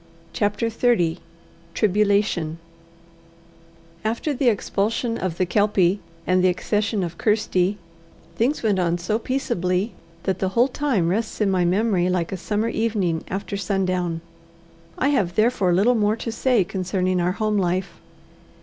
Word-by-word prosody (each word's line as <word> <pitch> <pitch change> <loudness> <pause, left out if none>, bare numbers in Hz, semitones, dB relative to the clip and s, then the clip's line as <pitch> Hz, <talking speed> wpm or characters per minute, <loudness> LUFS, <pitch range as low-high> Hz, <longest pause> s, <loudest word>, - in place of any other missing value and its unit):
CHAPTER 205 +2 0
XXX 185 -8 +1 0.6
Tribulation 200 -5 +1 1.5
After 230 +7 -1
the 265 -1 0
expulsion 225 +2 -1
of 180 -3 -3
the 185 - +2
Kelpie, 200 -1 +2 0.3
and 185 0 +2
the - - +5
accession 205 +3 0
of 170 -1 -6
Kirsty, 205 -3 +1 0.6
things 255 +5 0
went 205 -4 +2
on 175 -1 +1
so 195 +6 -1
peaceably, 195 -6 -1 0.3
that 190 -2 -1
the 190 - 0
whole 245 +3 +5
time 250 - 0
rests 215 +4 -2
in 205 -3 +2
my 180 -2 +2
memory 185 -1 +2
like 180 -2 -1
a 190 - -3
summer 210 +5 -1
evening 210 -8 0
after 200 +1 -4
sundown. 185 -3 -1 0.8
I 270 - +2
have 190 -11 +1
therefore 215 -4 +2
little 200 +8 +4
more 215 -2 +2
to 230 0 -5
say 235 -2 +2
concerning 185 0 -1
our 180 +1 +1
home 215 0 0
life. 185 +1 -1
200 Hz, 140 wpm, -23 LUFS, 180-220 Hz, 1.5 s, the